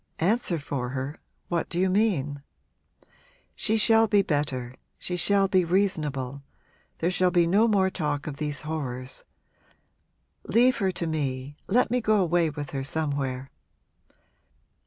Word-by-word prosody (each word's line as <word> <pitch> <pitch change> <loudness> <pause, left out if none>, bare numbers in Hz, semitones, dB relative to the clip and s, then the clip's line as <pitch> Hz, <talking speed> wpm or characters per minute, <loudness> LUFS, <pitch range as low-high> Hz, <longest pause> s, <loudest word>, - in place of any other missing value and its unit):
'Answer 190 0 +1
for 140 -4 -4
her 135 +3 -4 0.3
what 170 -1 -1
do 175 - -2
you 190 - +3
mean?' 185 -9 +1 1.1
'She 220 0 0
shall 225 +1 +5
be 205 -1 +4
better 135 -6 -2 0.2
she 180 - -4
shall 195 +2 +3
be 185 -1 +3
reasonable 150 -8 -1 0.6
there 170 +2 0
shall 180 0 +2
be 175 -1 +3
no 200 +7 +4
more 195 -3 +2
talk 150 -5 -2
of 150 -2 -5
these 150 -1 -1
horrors. 135 -5 -5 1.2
Leave 245 +4 +4
her 190 -1 +1
to 175 - -4
me 140 -3 -3
let 235 +3 +2
me 250 0 +1
go 215 -1 +3
away 175 -2 +2
with 145 -2 -6
her 135 -1 -3
somewhere.' 140 -3 -2
165 Hz, 140 wpm, -26 LUFS, 140-195 Hz, 1.2 s, shall